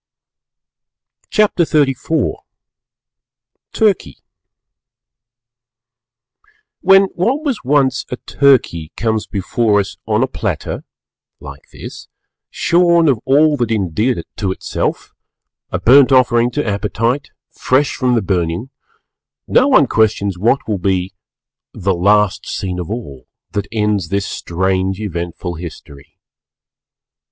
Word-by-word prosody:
CHAPTER 210 -5 +2
XXXIV 150 0 0 1.4
TURKEY 195 - 0 2.6
When 195 0 +6
what 250 - 0
was 270 -8 -2
once 135 -1 +1
a - - -3
Turkey 125 - +1
comes 110 +1 -1
before 105 +2 0
us 100 - -4
on - - +2
a - - +1
platter - - -4 0.5
(like 70 -1 -12
this) - - -10 0.4
shorn 170 -1 +3
of 130 -6 +2
all 150 +3 +4
that 120 -3 -1
endeared 105 +3 0
it 85 - -7
to 95 -3 -1
itself, - - -3 0.6
a - - -2
burnt 135 +2 +6
offering 125 -2 +4
to 145 +4 -3
Appetite, 115 +6 -1 0.2
fresh 135 +2 0
from 125 -1 +1
the 115 - 0
burning, 90 +5 -2 0.8
no - - +4
one - - +5
questions 100 -3 +1
what 115 +9 0
will 105 -3 -1
be 95 0 -1 0.6
the 95 +1 0
"_... - - -3
last 105 0 +2
scene 90 -2 -4
of 85 - -5
all. 70 - -7 0.2
That 100 -1 -3
ends 105 -5 0
this 100 +3 -1
strange 95 +2 -2
eventful 85 -3 -5
history. 80 -3 -11
110 Hz, 115 wpm, -17 LUFS, 95-135 Hz, 2.6 s, When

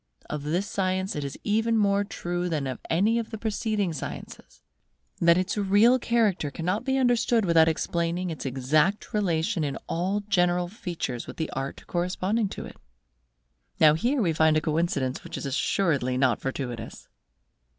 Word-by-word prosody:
Of 150 - -3
this 165 +7 -1
science 190 0 -1
it 150 - -3
is 140 -1 -5
even 225 +2 +1
more 200 -1 +3
true 175 -3 -3
than 155 -4 -1
of 130 -2 -4
any 210 +8 +2
of 230 - -5
the 220 - -6
preceding 215 -4 -1
sciences, 150 - -8 0.6
that 170 0 +5
its 185 +3 -1
real 205 +6 +4
character 220 -11 +1
cannot 180 - -2
be 265 0 +1
understood 240 -3 +2
without 165 -2 +5
explaining 170 +2 -1
its 160 - -6
exact 140 +9 +1
relation 180 -2 0
in 140 -2 -2
all 190 +5 -1
general 180 -3 +1
features 170 - -5
with - - -9
the 160 - -3
art 135 0 -5
corresponding 185 +4 -1
to - - -7
it. - - -11 1.0
Now 155 -1 +7
here 240 - +1
we 165 -3 +1
find 160 0 +4
a - - +1
coincidence 155 -5 -1
which - - -7
is - - -5
assuredly 135 -2 0
not 130 -4 +2
fortuitous. 125 -4 -5
175 Hz, 160 wpm, -26 LUFS, 155-205 Hz, 1.0 s, Now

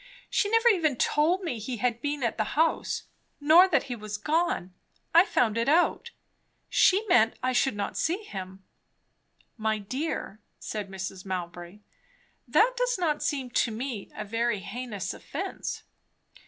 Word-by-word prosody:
She 410 - +2
never 455 +2 +3
even 325 - +2
told 325 +9 +2
me 285 -10 -3
he 235 +3 -4
had 235 +1 -1
been 290 -1 -2
at 235 - -1
the 215 - +2
house, 325 +1 +1 0.4
nor 320 +6 +7
that 310 -8 +2
he 250 - -5
was 210 -2 -6
gone. 310 - 0 0.4
I 340 +3 +7
found 230 - +1
it 230 - +1
out. 350 +8 +2 0.6
She 395 +4 +4
meant 230 - +4
I 255 0 +1
should 260 -1 +2
not 200 -1 -3
see 365 +7 -1
him." 190 - -8 0.9
"My 220 -1 0
dear," 215 0 -4 0.2
said 210 -2 -5
Mrs. 190 -1 -6
Mowbray, 180 +1 -6 0.7
"that - - +4
does - - 0
not 315 -5 0
seem 265 -4 -2
to 240 - +2
me 230 -2 -5
a 215 - -5
very 230 -1 -1
heinous 220 -3 -5
offence." - - -5
245 Hz, 155 wpm, -27 LUFS, 210-325 Hz, 0.9 s, nor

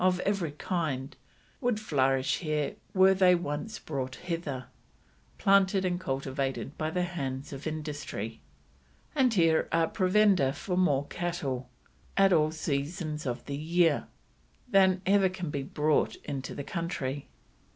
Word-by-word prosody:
of 185 0 +3
every 195 -7 -1
kind 150 -5 -2 0.4
would 245 -5 0
flourish 135 -8 +1
here 155 -3 -1 0.2
were 190 0 +6
they 185 -1 +5
once 170 +6 -3
brought 130 -3 -4
hither, 165 -7 -4 0.7
planted 195 -1 +4
and 180 -1 0
cultivated 135 -1 -3
by 155 0 -2
the 180 +2 0
hands 140 -6 -4
of 140 +3 -6
Industry; 150 -8 -5 0.7
and 255 -6 +3
here 165 -3 +3
are 165 -1 +3
provender 190 -7 +3
for 180 +4 -3
more 145 -7 +2
cattle, 140 -8 -3 0.5
at 195 -1 +6
all 155 -2 +4
seasons 155 0 -3
of 120 -1 -3
the 140 - -4
year, 165 +1 +2 0.6
than 190 -4 +4
ever 195 0 +4
can 180 -4 -5
be 140 - -2
brought 150 +2 +1
into 135 -2 -4
the 140 - -4
country." 145 -5 -3
160 Hz, 135 wpm, -29 LUFS, 140-185 Hz, 0.7 s, were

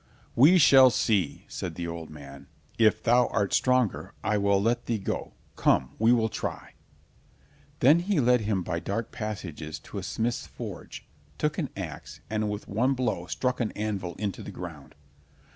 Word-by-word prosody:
"We 155 +10 +7
shall 135 -5 +8
see," 110 - 0
said 85 -3 -5
the 85 - -4
old 85 -1 -6
man. 70 -2 -11 0.3
"If 110 -2 +4
thou 120 0 +4
art 100 -3 -1
stronger, 125 -4 +1
I 105 - +1
will 100 0 +3
let 120 +4 0
thee 115 - 0
go—come, 70 -8 -1
we 110 +2 +4
will 115 -2 +3
try." - - -5 1.1
Then 145 +7 +6
he 185 -1 0
led 125 -2 +4
him 100 -3 -1
by 85 -1 -2
dark 105 +6 -3
passages 95 - -5
to - - -7
a - - -5
smith's 120 +2 -2
forge, - - -8 0.3
took 150 +2 -1
an 150 - -2
ax, 80 -6 -7
and 110 -1 0
with 105 0 -5
one 125 +7 +1
blow 125 -1 -2
struck 125 -1 -1
an 115 -3 -1
anvil 100 -4 -3
into 100 -1 -3
the - - -8
ground. - - -9
110 Hz, 165 wpm, -27 LUFS, 95-125 Hz, 1.1 s, shall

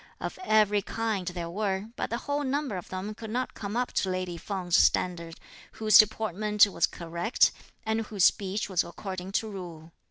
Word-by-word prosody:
Of - - -5
every 210 - +3
kind 215 -3 -2
there 175 -2 -4
were, 200 +1 -2
but - - -3
the 235 - -1
whole 285 +3 -2
number 280 -4 -1
of 180 - -7
them 190 +3 -4
could 220 +1 -9
not 250 +3 -2
come 205 +1 -5
up 250 0 -1
to 190 - 0
lady 185 -1 -3
Feng's 180 0 -2
standard, 170 -2 +2 0.3
whose 215 -2 +6
deportment 210 -1 +4
was 200 - +1
correct 170 +7 +1 0.3
and 220 0 0
whose 200 -4 0
speech 195 +2 +2
was 185 -3 +1
according 185 +2 -7
to 220 - 0
rule. 170 -4 -9
200 Hz, 180 wpm, -28 LUFS, 180-220 Hz, 0.3 s, whose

